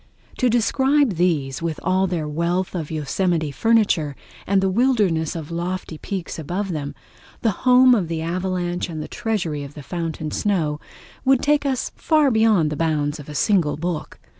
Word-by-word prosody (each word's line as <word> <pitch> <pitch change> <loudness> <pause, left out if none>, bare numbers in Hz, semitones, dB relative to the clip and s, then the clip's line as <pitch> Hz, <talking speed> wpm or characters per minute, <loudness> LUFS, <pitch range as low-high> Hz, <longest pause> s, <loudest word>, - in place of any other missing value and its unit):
To 255 - +3
describe 265 +3 +3
these, 155 -7 0
with 165 -2 -3
all 185 +1 +2
their 170 -4 -2
wealth 170 +4 -1
of 165 -5 -4
Yosemite 160 +1 -1
furniture, 195 -7 +2 0.3
and 195 0 +3
the 190 - +1
wilderness 190 - +1
of 160 -1 -6
lofty 170 -1 -4
peaks 190 -4 -5
above 180 +6 -3
them, 145 -3 -4 0.5
the 225 - +3 0.2
home 250 0 +7
of 200 -8 +1
the 160 -1 -3
avalanche 180 0 -2
and 155 -2 -5
treasury 175 -10 -2
of 140 +1 -10
the 150 - -9
fountain 160 0 -4
snow, 160 -8 0 0.4
would 265 -1 +3
take 290 -1 +2
us 260 -2 -1
far 305 -4 +3
beyond 220 -9 +3
the - - -2
bounds 150 -2 0
of 145 - -10
a 150 - -7
single 170 -4 +2
book. 170 0 -4
175 Hz, 165 wpm, -22 LUFS, 155-210 Hz, 0.5 s, home